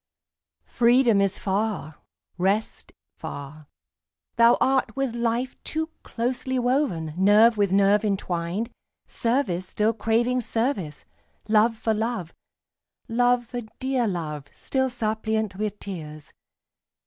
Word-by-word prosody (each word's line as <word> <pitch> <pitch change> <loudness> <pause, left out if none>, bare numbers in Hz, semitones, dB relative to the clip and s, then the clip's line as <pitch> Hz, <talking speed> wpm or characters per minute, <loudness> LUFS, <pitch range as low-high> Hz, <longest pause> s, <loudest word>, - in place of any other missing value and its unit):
Freedom 240 -3 +4
is 195 -1 +1
far, 195 -5 -2 0.4
rest 195 +4 -1 0.3
far. 145 +1 -8 0.7
Thou 235 0 +6
art 265 0 +1
with 270 -3 -1
life 235 +2 -2
Too 320 +1 -3
closely 255 +2 -2
woven, 245 - 0
nerve 210 +5 +5
with 200 -3 +1
nerve 200 +2 +4
intwined; 190 +1 -2 0.3
Service 230 -8 0
still 215 +2 +1
craving 230 +3 +1
service, 225 - -2 0.4
love 220 +1 +3
for 220 0 0
love, 220 -6 -3 0.7
Love 245 +1 +2
for 245 +1 -5 0.2
dear 260 -3 0
love, 155 -6 -4
still 265 -1 -1
suppliant 220 -3 -2
with 210 0 -2
tears. 155 -7 -8
220 Hz, 110 wpm, -25 LUFS, 190-245 Hz, 0.7 s, Thou